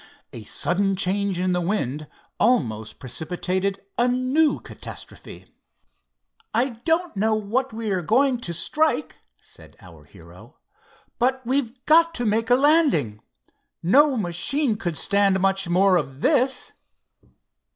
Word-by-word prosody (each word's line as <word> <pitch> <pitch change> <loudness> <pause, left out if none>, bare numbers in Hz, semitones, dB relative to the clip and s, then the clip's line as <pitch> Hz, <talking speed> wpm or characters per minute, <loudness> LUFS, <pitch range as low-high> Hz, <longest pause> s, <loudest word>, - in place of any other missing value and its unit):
A 115 - -8
sudden 195 - 0
change 195 -1 -1
in 185 0 0
the 180 0 0
wind 155 - -2 0.3
almost 115 - 0
precipitated 180 +8 -3 0.2
a 240 - +3
new 255 +5 +1
catastrophe. - - -10 1.1
"I 250 +4 +2
don't 325 +7 -2
know 215 +2 +1
what 230 +5 -2
we 220 -1 -4
are 185 -2 0
going 250 - +2
to 175 - -4
strike," 305 - 0 0.2
said - - -14
our - - -16
hero; - - -17 0.6
"but 260 +1 0
we've 255 -1 -2
got 330 +1 +4
to 245 - -2
make 225 +2 0
a 245 - +6
landing. 265 - +2 0.6
No 275 - +4
machine 215 - 0
could 175 -7 -4
stand 200 +3 +2
much 195 -1 +1
more 185 +1 +4
of 135 -3 -5
this." 260 +1 +1
210 Hz, 130 wpm, -23 LUFS, 180-255 Hz, 1.1 s, a